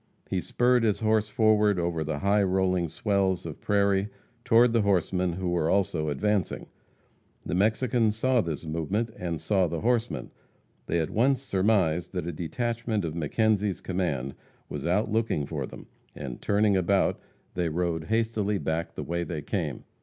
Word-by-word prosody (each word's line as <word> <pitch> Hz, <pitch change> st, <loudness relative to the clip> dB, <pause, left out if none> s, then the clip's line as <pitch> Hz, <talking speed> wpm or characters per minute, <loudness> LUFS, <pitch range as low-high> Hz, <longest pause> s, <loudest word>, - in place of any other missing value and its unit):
He -, -, 0 dB
spurred 125 Hz, 0 st, +2 dB
his 110 Hz, -2 st, +1 dB
horse 110 Hz, -1 st, +2 dB
forward 105 Hz, -3 st, +3 dB
over 85 Hz, -2 st, -1 dB
the 75 Hz, -1 st, -3 dB
high 100 Hz, +5 st, +2 dB
rolling 95 Hz, -2 st, +1 dB
swells 95 Hz, 0 st, 0 dB
of 80 Hz, -3 st, -7 dB
prairie 100 Hz, -1 st, +2 dB, 0.3 s
toward 115 Hz, +1 st, +5 dB
the 115 Hz, -, +3 dB
horsemen, 90 Hz, -2 st, +1 dB
who 90 Hz, +1 st, -3 dB
were 85 Hz, -2 st, +1 dB
also 90 Hz, -6 st, +1 dB
advancing. 100 Hz, +5 st, -1 dB, 0.8 s
The -, -, -3 dB
Mexicans 110 Hz, +3 st, +2 dB
saw 125 Hz, +2 st, +2 dB
this 80 Hz, -3 st, -4 dB
movement, 90 Hz, +9 st, -2 dB
and 85 Hz, -6 st, -4 dB
saw 95 Hz, +3 st, +2 dB
the 85 Hz, -1 st, -4 dB
horsemen. 120 Hz, 0 st, 0 dB, 0.6 s
They -, -, +1 dB
at 80 Hz, -2 st, -1 dB
once 130 Hz, +4 st, +2 dB
surmised 95 Hz, -7 st, +1 dB
that 90 Hz, -3 st, -2 dB
a 85 Hz, -, -2 dB
detachment 110 Hz, +5 st, -2 dB
of 80 Hz, -, -3 dB
McKenzie's 100 Hz, +5 st, +1 dB
command 75 Hz, -8 st, -2 dB, 0.4 s
was -, -, -4 dB
out 105 Hz, +5 st, +1 dB
looking 110 Hz, -9 st, 0 dB
for 70 Hz, -3 st, -4 dB
them, -, -, -11 dB, 0.3 s
and 65 Hz, -4 st, -7 dB
turning 105 Hz, 0 st, +2 dB
about, 95 Hz, +1 st, +2 dB, 0.3 s
they 85 Hz, -2 st, -1 dB
rode 80 Hz, -1 st, -1 dB
hastily 110 Hz, 0 st, 0 dB
back 80 Hz, -2 st, -3 dB
the -, -, -4 dB
way 85 Hz, +1 st, -2 dB
they 80 Hz, -4 st, -5 dB
came. -, -, -3 dB
95 Hz, 160 wpm, -27 LUFS, 85-110 Hz, 0.8 s, toward